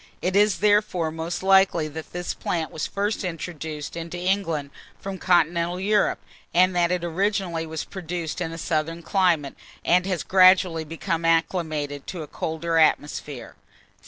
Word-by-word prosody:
It 185 Hz, +1 st, -1 dB
is 205 Hz, -1 st, +3 dB
therefore 205 Hz, -6 st, +2 dB
most 165 Hz, +3 st, -4 dB
likely 190 Hz, -4 st, +4 dB
that 160 Hz, +1 st, -8 dB
this 175 Hz, 0 st, -3 dB
plant 165 Hz, -2 st, -3 dB
was 155 Hz, -, -3 dB
first 205 Hz, +2 st, -2 dB
introduced 160 Hz, -4 st, -5 dB
into 170 Hz, +1 st, -5 dB
England 175 Hz, -6 st, -1 dB, 0.3 s
from 195 Hz, -1 st, -6 dB
continental 175 Hz, 0 st, +2 dB
Europe, 205 Hz, +2 st, +2 dB, 0.4 s
and 185 Hz, +1 st, +4 dB
that 175 Hz, 0 st, +2 dB
it 180 Hz, -1 st, -1 dB
originally 175 Hz, -1 st, -1 dB
was 160 Hz, -1 st, -4 dB
produced 175 Hz, -2 st, -5 dB
in 165 Hz, -2 st, -2 dB
a 165 Hz, -, -7 dB
southern 165 Hz, +1 st, -2 dB
climate, 170 Hz, -8 st, +1 dB, 0.3 s
and 180 Hz, +2 st, +3 dB
has 185 Hz, -3 st, -1 dB
gradually 185 Hz, -3 st, +5 dB
become 165 Hz, +2 st, -3 dB
acclimatized 160 Hz, -4 st, 0 dB
to 175 Hz, -4 st, -5 dB
a -, -, -9 dB
colder 165 Hz, +2 st, -2 dB
atmosphere. 145 Hz, -3 st, 0 dB
170 Hz, 150 wpm, -24 LUFS, 160-185 Hz, 0.4 s, gradually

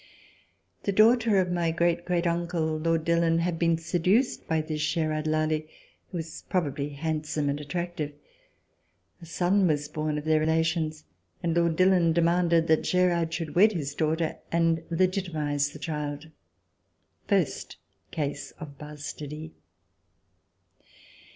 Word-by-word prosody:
The 200 Hz, -, -1 dB
daughter 225 Hz, +1 st, +5 dB
of 180 Hz, -1 st, +2 dB
my 170 Hz, -2 st, +1 dB
great 170 Hz, +1 st, +1 dB
great 175 Hz, -1 st, 0 dB
uncle, 170 Hz, -2 st, 0 dB
Lord 165 Hz, 0 st, 0 dB
Dillon, 170 Hz, 0 st, +3 dB
had 170 Hz, 0 st, -1 dB
been 165 Hz, -1 st, +3 dB
seduced 180 Hz, +9 st, +1 dB
by 160 Hz, -1 st, +1 dB
this 155 Hz, -1 st, -3 dB
Gerard 155 Hz, -1 st, 0 dB
Lally, 155 Hz, 0 st, 0 dB, 0.4 s
who 180 Hz, -, -5 dB
was 165 Hz, -1 st, -6 dB
probably 145 Hz, -5 st, -1 dB
handsome 150 Hz, 0 st, -2 dB
and 145 Hz, +1 st, -2 dB
attractive. 170 Hz, -1 st, -4 dB, 1.1 s
A 170 Hz, -, -11 dB
son 180 Hz, +3 st, +2 dB
was 150 Hz, -2 st, 0 dB
born 155 Hz, 0 st, -2 dB
of 150 Hz, -, -5 dB
their 155 Hz, 0 st, +3 dB
relations, 160 Hz, 0 st, 0 dB, 0.4 s
and 170 Hz, -1 st, 0 dB
Lord 170 Hz, -1 st, +2 dB
Dillon 185 Hz, -2 st, +4 dB
demanded 170 Hz, 0 st, +3 dB
that 160 Hz, -1 st, +3 dB
Gerard 175 Hz, -3 st, +1 dB
should 165 Hz, -2 st, -4 dB
wed 210 Hz, +5 st, +5 dB
his 145 Hz, -5 st, -3 dB
daughter 160 Hz, +2 st, -1 dB
and 165 Hz, -1 st, +2 dB
legitimatize 165 Hz, -5 st, 0 dB
the -, -, -10 dB
child: 150 Hz, 0 st, -5 dB, 1.0 s
first -, -, 0 dB, 0.3 s
case 145 Hz, -2 st, -3 dB
of 145 Hz, -4 st, -10 dB
bastardy. 150 Hz, +1 st, -7 dB
165 Hz, 130 wpm, -27 LUFS, 155-175 Hz, 1.1 s, daughter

